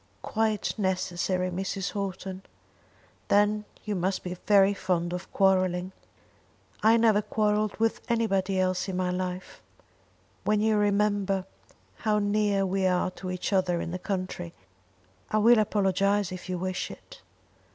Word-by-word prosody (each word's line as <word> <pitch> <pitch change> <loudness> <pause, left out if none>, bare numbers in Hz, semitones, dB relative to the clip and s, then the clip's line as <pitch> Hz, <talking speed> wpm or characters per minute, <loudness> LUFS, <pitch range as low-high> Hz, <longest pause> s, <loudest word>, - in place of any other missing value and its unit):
"Quite 220 -2 0
necessary, 185 -1 -1
Mrs. 190 +1 -3
Houghton." 195 -2 -4 0.9
"Then 210 +1 +3 0.2
you 210 - -2
must 185 +1 -1
be 180 0 -4
very 200 -1 +6
fond 175 -3 -1
of 180 +1 -6
quarrelling." 185 -1 +2 0.9
"I 225 +2 +5
never 220 -2 +4
quarrelled 210 0 0
with 225 0 0
anybody 195 -5 +1
else 185 +1 0
in 185 - -3
my 180 -1 0
life." 180 0 -4 0.8
"When 210 0 +2
you 220 0 +2
remember 205 -2 +1 0.5
how 215 -2 +1
near 205 -1 +1
we 190 0 +1
are 180 0 +1
to 185 +1 -7
each 180 +2 -3
other 180 -2 +2
in 170 - -4
the 180 - -4
country. 185 - -4 0.8
I 215 - +1
will 230 +2 +6
apologise 200 -1 +1
if 185 0 -8
you 180 - -1
wish 185 +1 -3
it." - - -13
195 Hz, 140 wpm, -27 LUFS, 185-210 Hz, 0.9 s, very